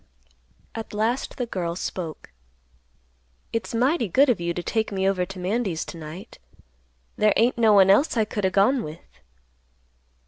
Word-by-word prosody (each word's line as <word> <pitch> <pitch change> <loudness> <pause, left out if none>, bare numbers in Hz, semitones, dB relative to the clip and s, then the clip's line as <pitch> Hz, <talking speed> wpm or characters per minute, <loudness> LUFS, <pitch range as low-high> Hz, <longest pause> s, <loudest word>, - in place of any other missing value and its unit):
At 225 -2 -7
last 225 +5 -1
the 245 - -1
girl 175 -7 -3
spoke, 170 - -6 1.2
"It's 230 0 -3
mighty 250 +1 +2
good 270 - +4
of 215 - -2
you 170 0 -1
to 175 +1 -4
take 220 +2 -1
me 190 -1 0
over 185 -2 0
to 195 +1 -9
Mandy's 185 -2 -2
to - - -9
night. 160 +5 -10 0.8
There 215 -1 +4
ain't 235 +2 +2
no 220 -2 +5
one 195 -1 +6
else 250 +5 +3
I 220 - +3
could 205 -2 -1
o' - - +1
gone 210 +7 +3
with." 155 - -11
200 Hz, 165 wpm, -24 LUFS, 180-230 Hz, 1.2 s, one